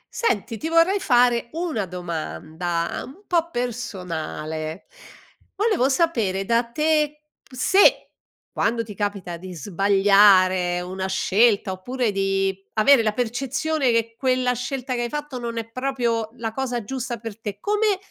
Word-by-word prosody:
Senti, 225 - -1
ti 320 +8 -4
vorrei 335 +5 +4
fare 245 -5 +3
una 320 - -2
domanda 170 -1 -4
un 370 +10 -13
po' 335 -2 +1
personale. 180 - -4 0.7
Volevo 405 - +2
sapere 230 - +1
da 235 +3 +2
te, 300 +3 0 0.3
se 320 +10 +4 0.4
quando 230 0 0
ti 215 -2 -9
capita 200 -4 -3
di 180 +1 -9
sbagliare 190 0 +4
una 190 +1 -4
scelta, 200 +1 +2
oppure 240 +5 -2
di 195 0 0 0.2
avere 235 +4 +5
la 215 -1 0
percezione 270 +5 -1
che 230 -1 +1
quella 255 0 +1
scelta 250 +1 -4
che 240 - -1
hai 240 - -2
fatto 295 -2 -5
non 235 -1 -5
è 225 -1 -3
proprio 240 -3 -1
la 230 -2 -4
cosa 245 -2 -2
giusta 250 +1 -4
per 225 -1 -8
te, 205 -2 -5
come 420 - +1
230 Hz, 135 wpm, -23 LUFS, 195-265 Hz, 0.7 s, avere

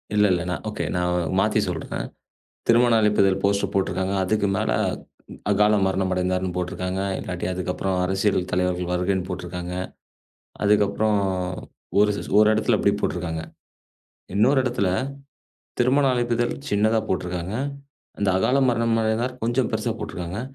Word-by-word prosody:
இல்ல 105 - +5
இல்ல. 90 -1 +1
நான் 90 - -3
ஓகே. - - -3
நான் 90 -1 0
மாத்தி - - +2
சொல்றேன். - - -4 0.6
திருமண 120 0 +5
அழைப்பிதழ் 100 -2 +3
போஸ்டர் 100 0 +1
போட்டுருக்காங்க. 95 0 0
அதுக்கு 105 +1 +1
மேல 110 - 0 0.8
அகால 105 +1 +4
மரணமடைந்தார் 95 -1 0
ன்னு 90 -1 -3
போட்டுருக்காங்க. 90 +1 -3 0.2
இல்லாட்டி 90 -1 -4
அதுக்கப்புறம் 90 +1 -2
அரசியல் 95 +2 +1
தலைவர்கள் 90 0 0
வருகைன்னு 90 +1 0
போட்டுருக்காங்க. 90 0 -5 0.9
அதுக்கப்புறம் 105 +1 +3 0.8
ஒரு 105 0 +4 0.3
ஒரு 105 0 +6
இடத்துல 110 +1 +2
அப்படி 100 - +3
போட்டுருக்காங்க. 85 -4 -2 0.9
இன்னொரு 130 +7 +4
இடத்துல 120 -7 0 0.9
திருமண 135 +3 +3
அழைப்பிதழ் 120 -1 0 0.2
சின்னதா 110 +2 +2
போட்டுருக்காங்க. 90 0 -2 0.7
அந்த 100 -2 +2
அகால 125 +8 +2
மரணமடைந்தார் 115 +1 0
கொஞ்சம் 120 +1 +1
பெருசா - - 0
போட்டுருக்காங்க. 90 +5 -5
100 Hz, 120 wpm, -24 LUFS, 90-110 Hz, 0.9 s, ஒரு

